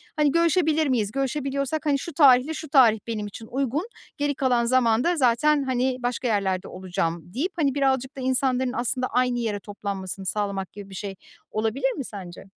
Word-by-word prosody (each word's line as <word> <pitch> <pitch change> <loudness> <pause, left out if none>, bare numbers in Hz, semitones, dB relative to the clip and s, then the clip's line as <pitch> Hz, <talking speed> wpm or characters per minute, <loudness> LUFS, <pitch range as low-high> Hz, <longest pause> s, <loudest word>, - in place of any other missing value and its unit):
hani, 300 -2 +3
görüşebilir 320 -2 +2
miyiz? 220 -6 0
Görüşebiliyorsak, 275 +3 -2
hani, 280 -2 +2
şu 335 - -7
tarihle 275 +1 +5
şu 315 -1 -7
tarih 235 -6 +6
benim 215 -3 -3
için 220 +2 -10
uygun, 275 - -1 0.3
geri 290 0 0
kalan 250 -3 +2
zamanda 255 +6 +3
zaten, 280 +3 +3
hani, 260 -1 0
başka 245 +1 -1
yerlerde 195 -3 0
olacağım 175 -1 -4
deyip, 345 +9 -1
hani, 285 -5 +1
birazcık 265 -1 0
da - - -5
insanların 260 0 +1
aslında 255 +1 -1
aynı 250 0 +1
yere 215 -3 -2
toplanmasını 195 -2 -6
sağlamak 200 -1 -2
gibi 200 -1 -10
bir 190 - -10
şey 195 0 -5 0.4
olabilir 225 +5 0
mi 270 -3 -5
sence? 185 -4 -9
250 Hz, 170 wpm, -25 LUFS, 210-275 Hz, 0.4 s, tarih